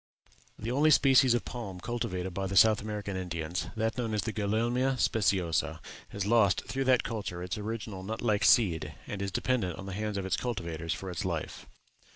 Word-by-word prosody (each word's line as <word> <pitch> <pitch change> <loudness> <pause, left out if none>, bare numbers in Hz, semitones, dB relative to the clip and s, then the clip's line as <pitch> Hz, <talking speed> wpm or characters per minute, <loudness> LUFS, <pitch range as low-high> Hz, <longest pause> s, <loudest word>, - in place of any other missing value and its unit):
"The 115 +2 -4
only 145 +5 +4
species 135 -4 +6
of 120 - -2
palm 100 -7 -6
cultivated 95 -5 -3
by 95 +1 -2
the 95 0 -1
South 110 +2 +6
American 105 -2 -4
Indians, 85 -2 -3
that 110 +2 -1
known 115 -3 -1
as 105 - 0
the 110 +1 -3
Gulielma 120 +5 0
speciosa, 95 -8 +1 0.3
has 100 -1 -4
lost 105 -2 +3
through 135 0 -2
that 130 -1 +4
culture 100 -6 -4
its 90 +2 -3
original 105 -2 -5
nut 110 +4 -5
like 105 -3 +2
seed, 80 -9 +3
and 100 - -5
is 100 - -1
dependent 95 -5 -1
on 95 - -7
the 100 - -6
hands 105 +1 -3
of 95 - -3
its 95 - 0
cultivators 85 -9 -3
for 95 -1 -6
its 90 +1 -3
life. 85 -4 -4
105 Hz, 190 wpm, -30 LUFS, 95-115 Hz, 0.3 s, species